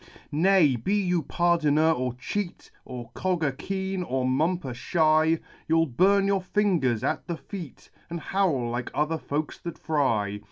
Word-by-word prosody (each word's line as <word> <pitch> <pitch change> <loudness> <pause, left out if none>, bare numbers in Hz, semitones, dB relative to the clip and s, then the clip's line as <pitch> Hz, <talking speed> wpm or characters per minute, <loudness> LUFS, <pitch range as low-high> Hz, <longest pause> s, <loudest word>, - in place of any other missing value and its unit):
Nay, 160 -4 +4
be 190 - 0
you 180 -4 +1
pardoner 160 -1 +2
or 125 -5 -1
cheat. 175 +9 -5
Or 120 -2 -8
cogger 165 -4 -1
keen, 190 +4 -3
or 130 -6 -1
mumper 145 +2 0
shy. 155 +4 +2 0.3
You'll 165 0 +3
burn 195 +9 +3
your 195 -1 +1
fingers 180 - +1
at - - -1
the 170 -2 -3
feat, 175 -8 -9 0.2
And 170 0 -4
howl 165 -9 0
like 120 0 -3
other 155 +2 0
folks 150 +1 -3
that 170 - -7
fry. 115 -10 0
160 Hz, 150 wpm, -26 LUFS, 130-185 Hz, 0.3 s, Nay